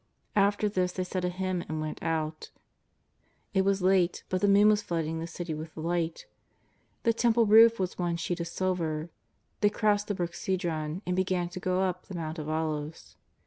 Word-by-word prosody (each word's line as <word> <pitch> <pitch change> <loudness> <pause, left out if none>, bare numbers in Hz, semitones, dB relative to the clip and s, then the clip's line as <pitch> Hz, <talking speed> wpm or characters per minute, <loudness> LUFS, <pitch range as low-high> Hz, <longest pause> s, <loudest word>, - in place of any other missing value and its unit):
After 205 +1 +3
this 185 -3 0
they 185 - -2
said 180 0 -3
a - - +1
hymn 185 -1 -2
and 155 0 -2
went 155 0 -4
out. 160 -1 -2 1.0
It 190 - +3
was 195 -1 +1
late, 185 -2 +3
but 185 - -1
the 205 - +3
moon 200 +1 +6
was 210 -1 +3
flooding 165 -3 -2
the 165 - -4
City 170 0 -5
with 155 +1 -7
light. 165 0 -2 0.8
The 230 - +3
Temple 230 0 +3
roof 225 +1 +7
was 185 -1 -2
one 175 -1 0
sheet 175 +1 -3
of 170 - -3
silver. 165 -3 -2 0.5
They 205 - +4
crossed 210 -1 +1
the 205 - -1
brook 175 -2 -3
Cedron, 170 -2 -2
and 180 - -1
began 185 -2 0
to 180 - -7
go 185 0 0
up 180 -1 -2
the 190 - -7
Mount 160 -1 -4
of 155 0 -5
Olives. 155 -1 -3
180 Hz, 190 wpm, -29 LUFS, 165-195 Hz, 1.0 s, roof